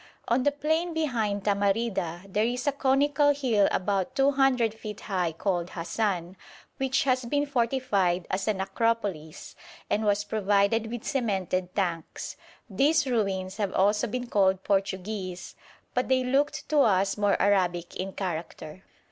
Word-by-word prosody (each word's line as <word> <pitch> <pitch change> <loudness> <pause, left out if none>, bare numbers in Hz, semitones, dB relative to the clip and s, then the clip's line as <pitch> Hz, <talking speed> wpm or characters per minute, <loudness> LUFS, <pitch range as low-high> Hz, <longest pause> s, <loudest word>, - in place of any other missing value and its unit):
On 240 +2 +2
the 290 - +2
plain 320 +4 -1
behind 225 -10 -1
Tamarida 200 -4 0
there 205 +2 0
is 245 +4 -1
a 285 - +3
conical 285 +1 +2
hill 235 -8 +2
about 195 +5 -1
200 270 -4 +3
feet 215 -2 -8
high 180 -5 -1
called 175 +1 -2
Hasan, 180 0 -2 0.4
which 265 0 +1
has 255 -2 +1
been 285 +4 0
fortified 230 - 0
as 190 +2 -1
an 205 -3 0
Acropolis, 195 -6 -2 0.4
and 215 - +1
was 205 -1 +2
provided 205 +1 +1
with 235 -1 -5
cemented 190 - -1
tanks. 175 -5 -3 0.3
These 290 +8 +2
ruins 195 -6 -1
have 200 -3 -1
also 210 +4 +2
been 245 +3 -3
called 190 -4 +2
Portuguese, 195 -1 -2 0.4
but 250 - 0
they 260 -1 +2
looked 290 +4 0
to 305 - +3
us 195 -6 +3
more 205 -1 +1
Arabic 180 -4 +1
in 190 +1 -4
character. 170 -2 -5
210 Hz, 140 wpm, -27 LUFS, 190-255 Hz, 0.4 s, a